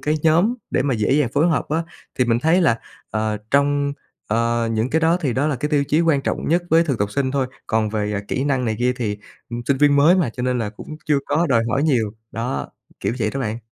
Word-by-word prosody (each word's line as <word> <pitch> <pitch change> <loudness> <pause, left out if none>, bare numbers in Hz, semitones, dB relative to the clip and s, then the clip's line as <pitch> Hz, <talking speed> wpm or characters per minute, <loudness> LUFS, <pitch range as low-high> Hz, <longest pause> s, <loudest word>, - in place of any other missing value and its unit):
cái 150 +1 0
nhóm 170 +9 +3 0.2
để - - +1
mà 135 -2 0
dễ 110 +3 +1
dàng 145 -4 +3
phối 150 +4 +3
hợp 160 - 0
á. 160 +2 0 0.4
Thì 125 - +4
mình 115 -1 +2
thấy 165 +8 +3
là, 120 -9 +3 0.3
ờ, 110 0 -1
trong, 140 0 +2 0.3
ờ, 115 +1 0
những 110 +3 0
cái 160 - +2
đó 165 +2 +3
thì 135 -5 0
đó 135 +5 0
là 145 -4 0
cái 150 +4 -2
tiêu 145 -2 +2
chí 155 - +3
quan 160 -5 +2
trọng - - -2
nhất 175 +2 +2
với 165 +1 +5
thực 135 -7 -1
tập 100 0 -1
sinh 135 +1 -1
thôi. 135 -2 0 0.2
Còn 110 -1 +1
về, 105 -1 -2
à, 100 - -1
kỹ 130 - -1
năng 135 -3 0
này 110 -2 -1
kia 125 +1 +2
thì, 105 -4 -3 0.3
ừm, 120 0 -4
sinh 140 - +2
viên 145 0 +4
mới 155 +6 +6
mà, 165 -10 +1
cho 125 - -6
nên 125 -1 0
là 105 -3 -2
cũng 155 - -10
chưa 150 -2 +3
có 160 +4 +1
đòi 115 -5 +3
hỏi 135 +4 +1
nhiều. 120 -9 +1 0.2
Đó, 110 - -3 0.3
kiểu 100 +3 -1
vậy 110 -2 0
đó 135 - -4
bạn. 110 -1 -2
135 Hz, 260 wpm, -21 LUFS, 115-150 Hz, 0.4 s, mới